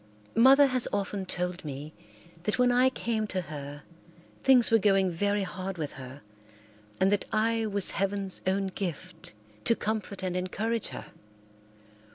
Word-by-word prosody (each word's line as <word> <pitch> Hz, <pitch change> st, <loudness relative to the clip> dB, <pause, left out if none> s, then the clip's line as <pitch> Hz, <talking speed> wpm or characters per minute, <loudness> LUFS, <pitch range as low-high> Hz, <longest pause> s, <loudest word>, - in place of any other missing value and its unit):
Mother 265 Hz, +5 st, +7 dB
has 255 Hz, -2 st, +1 dB
often 200 Hz, -1 st, -2 dB
told 180 Hz, 0 st, -3 dB
me 145 Hz, +1 st, -7 dB, 0.5 s
that 205 Hz, +4 st, -1 dB
when 250 Hz, 0 st, +4 dB
I 250 Hz, +1 st, +4 dB
came 225 Hz, -4 st, -2 dB
to 185 Hz, -2 st, -2 dB
her 145 Hz, -3 st, -8 dB, 0.6 s
things 255 Hz, -4 st, +5 dB
were 225 Hz, -, +6 dB
going 195 Hz, -2 st, +3 dB
very 205 Hz, +4 st, 0 dB
hard 190 Hz, 0 st, -5 dB
with 150 Hz, -3 st, -3 dB
her 130 Hz, +2 st, -10 dB, 0.8 s
and 190 Hz, +1 st, +3 dB
that 205 Hz, -, +1 dB
I 225 Hz, +1 st, +1 dB
was 200 Hz, -2 st, +2 dB
heaven's 195 Hz, 0 st, -2 dB
own 195 Hz, +1 st, +1 dB
gift 180 Hz, -, -6 dB, 0.3 s
to 230 Hz, -, +3 dB
comfort 210 Hz, -3 st, -3 dB
and 180 Hz, -1 st, -2 dB
encourage 215 Hz, +5 st, -1 dB
her. -, -, -9 dB
195 Hz, 150 wpm, -28 LUFS, 180-225 Hz, 0.8 s, Mother